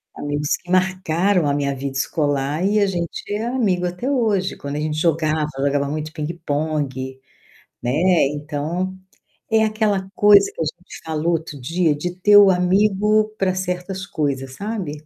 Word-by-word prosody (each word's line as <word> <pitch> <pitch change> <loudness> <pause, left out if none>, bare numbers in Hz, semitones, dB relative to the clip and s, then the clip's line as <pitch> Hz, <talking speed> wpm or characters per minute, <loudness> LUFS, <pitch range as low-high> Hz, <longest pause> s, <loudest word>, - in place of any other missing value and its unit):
amigos 145 0 -1
que 175 - -11
marcaram 185 -1 +2
a 140 - +1
minha 140 -1 -1
vida 135 +1 -4
escolar 145 +3 0
e 210 +1 +2
a 200 - +4
gente 175 -3 -3
é 215 +2 -2
amigo 210 -8 0
até 180 +10 -3
hoje. 215 -8 +1
Quando 140 +1 -5
a - - -2
gente 155 0 -2
jogava 155 -1 +1
jogava 140 0 0
muito 155 +1 -4
pingue-pongue, 150 -4 -3 0.6
né, 120 - -1 0.4
então, 150 +6 -3 0.5
é 220 0 +3
aquela 210 -3 0
coisa 205 -1 +6
que - - -18
a - - +1
gente 175 +4 -8
falou 160 +2 0
outro 155 -4 -4
dia 165 +2 +1
de 175 +4 -4
ter 205 +3 +5
o 200 -1 +8
amigo 205 +4 +2
para 190 -1 +1
certas 185 +1 -4
coisas, 135 -3 -3
sabe. 180 -9 -5
170 Hz, 160 wpm, -21 LUFS, 150-195 Hz, 0.6 s, o